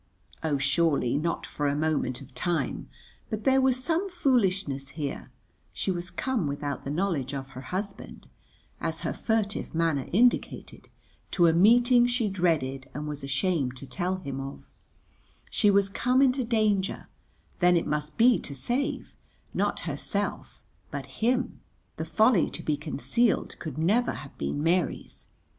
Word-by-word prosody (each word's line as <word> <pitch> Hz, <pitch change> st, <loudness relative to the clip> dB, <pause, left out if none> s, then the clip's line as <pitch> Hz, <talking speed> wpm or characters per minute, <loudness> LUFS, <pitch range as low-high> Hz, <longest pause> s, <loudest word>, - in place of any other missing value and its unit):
Oh, 155 Hz, -3 st, +1 dB
surely 140 Hz, -2 st, +2 dB
not 165 Hz, +4 st, -1 dB
for 145 Hz, -, -2 dB
a 140 Hz, -, +1 dB
moment 150 Hz, -5 st, 0 dB
of 135 Hz, -1 st, -13 dB
time. 175 Hz, +2 st, -2 dB, 0.4 s
But 215 Hz, -2 st, -3 dB
there 265 Hz, 0 st, +4 dB
was 260 Hz, -1 st, +2 dB
some 340 Hz, +6 st, 0 dB
foolishness 195 Hz, -, +1 dB
here; 145 Hz, -3 st, -4 dB, 0.4 s
she -, -, -1 dB
was 175 Hz, 0 st, -3 dB
come 245 Hz, -, -1 dB
without 145 Hz, -1 st, -3 dB
the -, -, -5 dB
knowledge 150 Hz, -5 st, -1 dB
of 135 Hz, -1 st, -5 dB
her 130 Hz, -1 st, -9 dB
husband, 195 Hz, +8 st, -6 dB, 0.5 s
as -, -, -3 dB
her -, -, -2 dB
furtive 215 Hz, -6 st, -1 dB
manner 160 Hz, -5 st, +1 dB
indicated, 240 Hz, +6 st, +1 dB, 0.4 s
to 175 Hz, -, +3 dB
a 165 Hz, -, +5 dB
meeting 240 Hz, +7 st, +6 dB
she 240 Hz, -3 st, 0 dB
dreaded 155 Hz, -8 st, 0 dB
and 150 Hz, +1 st, -4 dB
was 145 Hz, -1 st, -5 dB
ashamed 140 Hz, -1 st, 0 dB
to 140 Hz, -, -7 dB
tell 180 Hz, +6 st, -2 dB
him 140 Hz, -8 st, -5 dB
of; 135 Hz, +1 st, -7 dB, 0.9 s
she 210 Hz, -, +3 dB
was 200 Hz, -1 st, +4 dB
come 250 Hz, +6 st, +1 dB
into 260 Hz, 0 st, +3 dB
danger; 215 Hz, -4 st, 0 dB, 0.5 s
then 180 Hz, -1 st, +5 dB
it 165 Hz, -, 0 dB
must 150 Hz, 0 st, -2 dB
be 240 Hz, +1 st, +6 dB
to 140 Hz, -, -6 dB
save, 270 Hz, -, -2 dB, 0.4 s
not -, -, 0 dB
herself -, -, -3 dB, 0.3 s
but -, -, -5 dB
him; 250 Hz, +3 st, -1 dB, 0.4 s
the -, -, -3 dB
folly 220 Hz, -4 st, +3 dB
to -, -, -6 dB
be 150 Hz, -, +1 dB
concealed 160 Hz, -, 0 dB
could 155 Hz, -5 st, -6 dB
never 210 Hz, +10 st, +2 dB
have 135 Hz, -, -9 dB
been 145 Hz, -, -2 dB
Mary's. 170 Hz, +1 st, -1 dB
175 Hz, 150 wpm, -27 LUFS, 145-225 Hz, 0.9 s, meeting